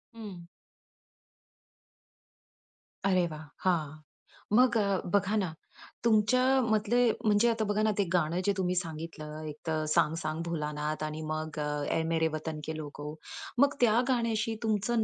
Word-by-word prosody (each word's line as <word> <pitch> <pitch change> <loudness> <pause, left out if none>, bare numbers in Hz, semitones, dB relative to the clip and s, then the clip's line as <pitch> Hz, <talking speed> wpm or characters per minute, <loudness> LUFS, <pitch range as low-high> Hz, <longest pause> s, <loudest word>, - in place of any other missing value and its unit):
हं. 210 -5 -8 2.7
अरे 185 -2 +3
वाह! 155 0 -7 0.2
हां. 165 -6 +1 0.7
मग 250 -1 +5
अ, 200 -3 +1
बघा 200 +2 +2
ना, 190 -6 0 0.5
तुमच्या 225 +2 +4 0.2
मधले 225 +1 +2 0.2
म्हणजे 210 +2 +4
आता 225 -1 0
बघा 205 +1 0
ना, 215 - +3
ते 200 - +3
गाणं 170 0 +2
जे 200 - +3
तुम्ही 180 -1 0
सांगितलं 155 -2 -5
एक 150 - -6
तर 155 -1 0
"सांग 155 - +3
सांग 155 +1 -2
भोलानाथ" 150 -2 -2
आणि 155 +1 -4
मग 155 0 -3
अ, 150 0 -1 0.2
"ए - - +2
मेरे 160 -1 +2
वतन 155 0 -4
के 160 - -4
लोगो" 150 -1 -6 0.5
मग 280 +1 +5
त्या 230 -1 +5
गाण्याशी 230 -3 +1
तुमचं 220 +1 +1
180 Hz, 145 wpm, -30 LUFS, 155-220 Hz, 2.7 s, मग